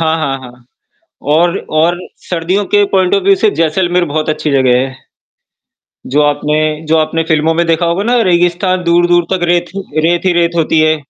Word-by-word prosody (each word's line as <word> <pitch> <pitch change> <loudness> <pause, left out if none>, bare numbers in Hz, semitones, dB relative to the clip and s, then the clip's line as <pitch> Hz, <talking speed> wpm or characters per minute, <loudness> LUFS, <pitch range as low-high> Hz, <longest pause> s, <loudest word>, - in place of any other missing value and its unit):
हाँ, 160 0 +1
हाँ, 135 -4 -2
हाँ, 125 -1 -14 0.6
और 170 +6 +1 0.2
और 175 +2 +1 0.3
सर्दियों 180 +4 -1
के 205 0 +5
पॉइंट 190 -1 +2
ऑफ़ 200 - +1
व्यू 195 0 +5
से 215 - +2
जैसलमेर 175 +2 +1
बहुत 155 0 -3
अच्छी 155 0 -2
जगह 130 -2 +3
है। 130 0 -3 1.2
जो 150 - +4
आपने 145 +1 0 0.3
जो 160 - +2
आपने 160 +1 0
फ़िल्मों 160 0 +1
में 170 0 0
देखा 165 +1 +1
होगा 170 +4 -1
ना 240 +1 +2
रेगिस्तान 180 0 +1
दूर-दूर 175 0 +2
तक 185 - -1
रेत 175 0 +1
ही 195 -5 -4
रेत 170 +2 0
ही 185 - +3
रेत 170 -1 +1
होती 160 -1 +1
है। 155 0 +2
170 Hz, 190 wpm, -13 LUFS, 155-180 Hz, 1.2 s, के